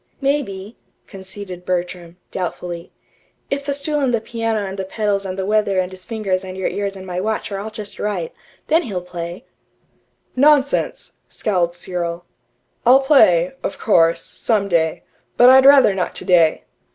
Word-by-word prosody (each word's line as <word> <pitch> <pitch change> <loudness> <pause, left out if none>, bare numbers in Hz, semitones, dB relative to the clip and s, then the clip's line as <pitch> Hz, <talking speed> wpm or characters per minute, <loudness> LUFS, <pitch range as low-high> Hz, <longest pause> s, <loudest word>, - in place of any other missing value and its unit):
"Maybe," 235 -8 -2 0.3
conceded 190 -2 -9
Bertram, 175 -1 -4
doubtfully; 175 -1 -5 0.6
"if 280 0 -1
the 285 - -2
stool 295 +1 -1
and 270 -3 +1
the 235 - +1
piano 225 -2 -2
and 195 0 -6
the - - -1
pedals 200 0 -2
and 185 0 -5
the 190 - -2
weather 210 -1 +1
and 185 0 0
his 185 -1 -12
fingers 200 -5 -2
and 185 0 -8
your 190 - -1
ears 200 -1 -3
and 190 -1 -9
my 180 -1 -3
watch 215 +1 -2
are 195 - -3
all 210 +2 -5
just 215 -1 -8
right 195 -6 -3 0.3
then 325 +2 +3
he'll 195 - -5
play." 175 0 -7 0.9
"Nonsense!" 285 +1 +2 0.2
scowled 175 -5 -1
Cyril. 175 -1 -4 0.6
"I'll 260 +3 +6
play, 185 - +4
of - - -4
course, 165 -6 +3
some 210 -4 -1
day. 160 -3 0 0.3
But 245 +1 +8
I'd 265 +1 +7
rather 275 -7 +7
not 185 -2 -3
today." 170 -3 +3
195 Hz, 165 wpm, -20 LUFS, 180-225 Hz, 0.9 s, But